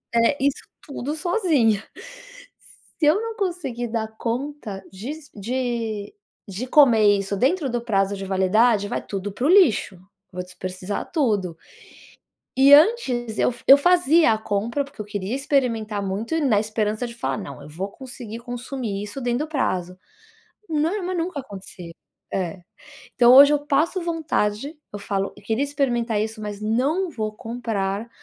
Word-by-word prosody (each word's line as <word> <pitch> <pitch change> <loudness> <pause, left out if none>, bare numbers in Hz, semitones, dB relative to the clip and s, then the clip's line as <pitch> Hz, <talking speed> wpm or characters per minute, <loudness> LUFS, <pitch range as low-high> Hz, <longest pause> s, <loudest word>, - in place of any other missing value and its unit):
é 235 +5 +3
isso 280 -1 0 0.2
tudo 285 +1 -5
sozinha. 310 - +2 1.2
Se 310 - +2
eu 320 - 0
não 455 -1 -5
conseguir 340 - -3
dar 220 -1 -2
conta 235 -5 -4
disso 280 +10 -8
des 200 - -10 0.7
de - - -45 0.3
de 205 +7 -5
comer 225 -8 +5
isso 195 0 -3
dentro 275 - +1
do 240 0 -1
prazo 200 -4 0
de 195 - -6
validade, 205 +3 +2
vai - - -2
tudo 200 0 -4
para 250 - -3
o - - +3
lixo, 265 - +4 0.4
vou 180 0 -4
desperdiçar 185 +1 -6
tudo". 205 - 0 1.0
E 275 +1 +7
antes 265 - +3
eu - - +3
f 235 - -15
eu - - +11
fazia 335 -4 +4
a 220 - 0
compra, 220 +6 -1
porque 275 - -14
eu - - -3
queria 205 +3 -3
experimentar 230 -7 0
muito 200 +8 -4 0.2
na 205 - +5
esperança 215 +2 -2
de 235 - -9
falar: 235 - -2
"Não, 140 -8 -8
eu 145 - -11
vou 185 +6 -5
conseguir 245 -4 -8
consumir 245 -3 -5
isso 210 +6 -7
dentro 245 +4 -1
do - - -20
prazo". 180 -9 -1 0.8
Nor 325 +6 0
mas 365 0 -3
nunca 330 -3 -2
acontecia, 190 -6 -10 0.4
é. 180 -1 -3 0.5
Então, 245 -1 +6
hoje 280 +2 +9
eu 290 0 0
passo 320 +7 +1
vontade, 300 -5 -2 0.2
eu 205 - -5
falo: 195 -1 -2
"Eu 205 - -15
queria 225 +6 0
experimentar 240 -6 0
isso, 220 0 -4
mas 210 -1 -6
não 280 - 0
vou 215 -4 -3
comprar, 220 -2 -3
235 Hz, 160 wpm, -23 LUFS, 205-285 Hz, 1.2 s, eu